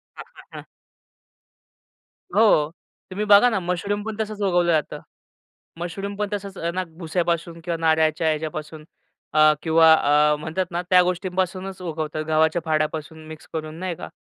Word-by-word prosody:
हां, - - -9
हां, - - -15
हां. - - -8 1.7
हो, 160 -9 +4 0.4
तुम्ही 200 +3 -3
बघा 205 +4 +7
ना 220 - 0
मशरूम 185 +4 -2
पण 220 0 -5
तसंच 215 -1 -4
उगवलं 175 -3 +2
जातं. 155 -3 -1 0.8
मशरूम 195 +4 -5
पण 210 - -1
तसंच 200 -1 -5 0.2
ना 185 - 0 0.2
भुस्यापासून 170 0 -2
किंवा 170 -1 -2
नारळच्या 160 0 +2
ह्याच्यापासून 155 0 -4 0.5
अ, 155 0 +6
किंवा 160 0 +6
अ, 150 0 +3
म्हणतात 160 +4 -2
ना 175 +1 -2
त्या 180 -1 +7
गोष्टींपासूनच 185 +1 -3
उगवतात, 155 -2 -4
गव्हाच्या 160 +2 +2
फाड्यापासून 155 0 -2
मिक्स 155 0 -11
करून, 155 -1 -5
नाही 185 -1 -3
का? - - -8
170 Hz, 145 wpm, -23 LUFS, 155-185 Hz, 1.7 s, बघा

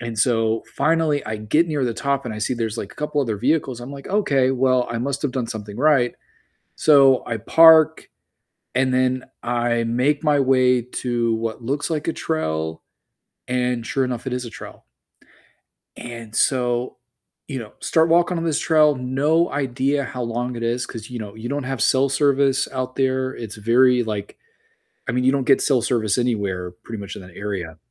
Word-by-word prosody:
And, 115 -2 -6
so, 115 0 +1
finally 160 -2 +1
I 110 0 -3
get 150 +11 +1
near 145 -4 -1
the 120 -2 -2
top 140 +2 -1
and 115 -3 -5
I - - -6
see 110 +4 -1
there's, 115 -1 -3
like, 100 - -6
a - - -24
couple 150 -1 -1
other 115 -6 -1
vehicles. 130 +1 0
I'm 125 +3 -8
like, 140 -1 -9
"Okay, 140 -11 +2
well, 130 -1 +2
I 115 - -2
must 135 +3 -3
have 145 - 0
done 125 -3 -2
something 105 -3 -7
right." 135 -2 +3 0.6
So 135 -4 +5
I 115 - -3
park 160 +6 +5 0.7
and 130 0 +2
then 130 0 +1 0.2
I 120 -1 0
make 130 +6 0
my 150 -2 +3
way 130 -2 +3
to 120 -1 -2
what 115 +1 -4
looks 140 +7 -2
like 155 -2 -3
a 165 - 0
trail, 80 - -3 0.7
and 125 -1 -1
sure 135 - 0
enough, 125 0 -4
it 130 - -3
is 125 0 -3
a 120 - -7
trail. - - -11 1.1
And 115 -2 -9
so, 125 -2 0 0.5
you 135 -3 -4
know, 110 -3 -10
start 160 0 +2
walking 175 +1 +3
on 165 - -2
this 160 -3 0
trail, 155 -2 +4
no 140 +6 +1
idea 140 +1 0
how 125 -2 -5
long 120 +2 -3
it 115 - -5
is 120 +2 -1
'cause, 110 -3 -9
you 125 -1 -6
know, 105 -1 -8
you 110 +2 -6
don't 145 0 -2
have 130 -2 -4
cell 135 +4 +3
service 140 0 +2
out 130 -1 -4
there. 130 -1 0
It's 110 -3 -7
very 125 +3 +3
like 105 -2 -5 0.7
I - - -2
mean, 125 +1 0
you 130 - +4
don't 140 -1 0
get 135 - +5
cell 135 -4 +2
service 115 -3 0
anywhere 100 -7 -1
pretty 110 +5 -9
much 100 -1 -7
in - - -9
that 90 -1 -15
area. 95 -6 -5
125 Hz, 195 wpm, -22 LUFS, 115-140 Hz, 1.1 s, So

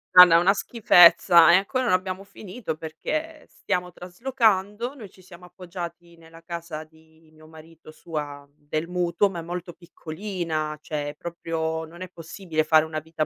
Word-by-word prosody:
Guarda, 180 -2 +10
una 185 +4 +4
schifezza. 175 -6 +6
E - - +7
ancora 250 +7 0
non 185 - +2
abbiamo 185 +1 -2
finito, 200 -1 -7
perché 305 - -5
stiamo 180 -2 -3
traslocando. 210 - -1
Noi 220 -9 -11
ci 185 - -21
siamo 180 -1 -14
appoggiati 175 -1 -9
nella 165 0 -17
casa 170 -2 -7
di 160 0 -24
mio 155 0 -18
marito, 160 0 -16
sua 145 -3 -7
del 155 +2 -4
mutuo, 180 +2 +1
ma 175 - -6
è - - -5
molto 175 +1 -7
piccolina, 165 -3 -5
cioè 150 -2 -4
è 145 - -9
proprio 160 -1 -4
non 170 +3 -14
è 185 - -6
possibile 165 -1 -4
fare 155 0 +4
una 155 -1 -4
vita 155 0 -3
170 Hz, 165 wpm, -24 LUFS, 160-185 Hz, -, Guarda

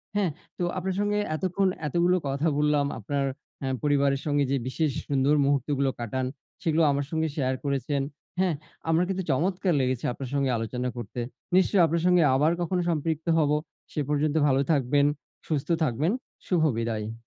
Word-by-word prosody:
হ্যাঁ, 195 -6 +2 0.3
তো - - -2
আপনার 185 0 -2
সঙ্গে 205 0 +1 0.2
এতক্ষণ 190 +3 0 0.2
এতগুলো 175 +4 +2
কথা 140 +4 0
বললাম, 150 -1 +3
আপনার 140 +6 -1 0.4
অ্যা 135 - -2
পরিবারের 140 -2 +2
সঙ্গে 145 -1 +2
যে 140 - +2
বিশেষ 155 +3 0 0.2
সুন্দর 140 +1 +3
মুহূর্তগুলো 140 0 +1
কাটান, 130 +3 -2 0.4
সেগুলো 160 0 +2
আমার 140 0 0
সঙ্গে 160 0 +1
শেয়ার 130 -3 0
করেছেন। 140 0 0 0.4
হ্যাঁ, 185 -4 +2 0.3
আমার 165 +2 +4
কিন্তু 190 -1 -1
চমৎকার 180 +5 +1
লেগেছে 130 -1 -1
আপনার 130 0 -6
সঙ্গে 140 -2 +1
আলোচনা 125 +3 -2
করতে। 120 +1 -6 0.4
নিশ্চয় 190 0 +4
আপনার 165 +1 0
সঙ্গে 180 -2 +5
আবার 150 +4 +3
কখনো 175 +1 0
সম্পৃক্ত 160 0 -1
হব। 150 -2 +2 0.4
সে 150 - -1
পর্যন্ত 150 +1 +1
ভালো 135 -1 +3
থাকবেন, 140 0 +3 0.4
সুস্থ 150 0 -2
থাকবেন, 150 +5 +1 0.4
শুভ 180 -3 +2 0.2
বিদায়। 110 -1 -2
145 Hz, 160 wpm, -27 LUFS, 135-170 Hz, 0.4 s, সঙ্গে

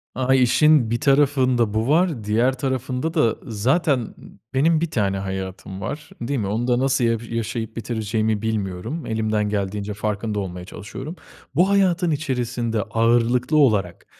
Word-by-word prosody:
A, 130 0 +2
işin 130 0 +4
bir 120 - 0
tarafında 135 -6 +3
bu 110 +2 0
var, 155 -5 +2
diğer 115 +5 +2
tarafında 130 +3 -2
da 150 -10 +2
zaten, 130 - +1
ııı, 115 - -7 0.4
benim 155 +4 +3
1 170 -2 -1
tane 100 -4 0
hayatım 95 0 -5
var. 150 +7 -5
Değil 130 +3 -1
mi? 100 - -2
Onu 110 +5 -1
da 120 -1 +2
nasıl 135 -1 +1
ya 115 0 +2
yaşayıp 115 -1 -3
bitireceğimi 110 -1 -1
bilmiyorum. 110 - -3
Elimden 110 -1 0
geldiğince 100 0 -2
farkında 105 0 -2
olmaya 90 -2 -5
çalışıyorum. 130 - -8 0.4
Bu 180 +6 +4
hayatın 185 -3 +2
içerisinde 125 -6 -1
ağırlıklı 120 +6 +2
olarak 105 - +2
115 Hz, 150 wpm, -22 LUFS, 105-135 Hz, 0.4 s, işin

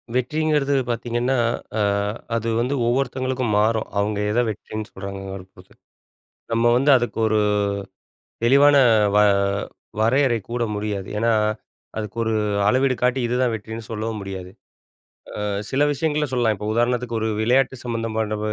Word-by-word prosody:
வெற்றிங்கிறது 150 +2 +1 0.2
பார்த்தீங்கன்னா, 120 +2 -1 0.4
அ - - 0 0.6
அது 115 0 -1
வந்து 125 +4 0
ஒவ்வொருத்தங்களுக்கும் 130 -2 0
மாறும். 110 +1 +1
அவுங்க 105 0 0
எத 115 - +1
வெற்றின்னு 110 0 -6
சொல்றாங்கறப் 95 -1 -7
பொருத்து. - - -18 0.8
நம்ம 115 +1 +3
வந்து 140 +3 +4
அதுக்கு 120 -1 -3
ஒரு 110 0 +2 1.0
தெளிவான 140 +4 +6 0.4
வ - - +5 0.8
வரையறை 120 +1 +3
கூற 120 0 -1
முடியாது. 105 -2 -3
ஏன்னா, 115 +2 +2 0.6
அதுக்கு 105 0 -5
ஒரு 110 0 0 0.3
அளவீடு 130 +3 +3
காட்டி 125 +1 +2
இதுதான் 125 0 +1
வெற்றின்னு 110 +1 -6
சொல்லவும் 110 0 -3
முடியாது. 95 -2 -7 0.9
அ - - -2 0.3
சில 135 - 0
விஷயங்கள 150 +1 0
சொல்லலாம். 120 -3 +2
இப்ப 105 - -5
உதாரணத்துக்கு 120 0 0
ஒரு 110 - 0
விளையாட்டு 130 +4 +2
சம்மந்தமான 110 -2 -2
115 Hz, 125 wpm, -22 LUFS, 110-130 Hz, 1.0 s, தெளிவான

